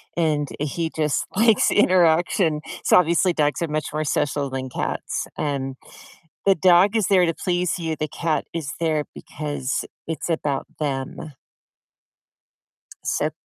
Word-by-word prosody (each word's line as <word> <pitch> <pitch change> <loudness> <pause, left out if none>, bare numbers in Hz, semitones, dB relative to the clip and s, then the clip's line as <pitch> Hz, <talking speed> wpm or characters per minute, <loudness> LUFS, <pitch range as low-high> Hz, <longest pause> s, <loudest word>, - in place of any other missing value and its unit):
and 155 -4 +1
he 160 +3 -2
just 150 -2 -1
likes 225 +1 +4
interaction, 175 -4 +3 0.2
so - - +5
obviously, 175 +1 +3
dogs 150 -1 0
are 170 - 0
much 155 0 -2
more 155 0 -1
social 145 -1 0
than 130 0 -4
cats, - - -3
um, 135 -2 -2 0.7
the 195 -1 +5
dog 185 +4 +5
is 210 -5 +1
there 185 -3 +5
to 165 - 0
please 180 +1 -1
you, 160 -2 -2
the 155 - -3
cat 160 0 -1
is 155 -3 -4
there 155 -3 0
because 145 -3 -4 0.2
it's 160 -1 -3
about 145 -4 -1
them. 145 +1 -4 1.7
So, - - 0
160 Hz, 140 wpm, -23 LUFS, 145-175 Hz, 1.7 s, so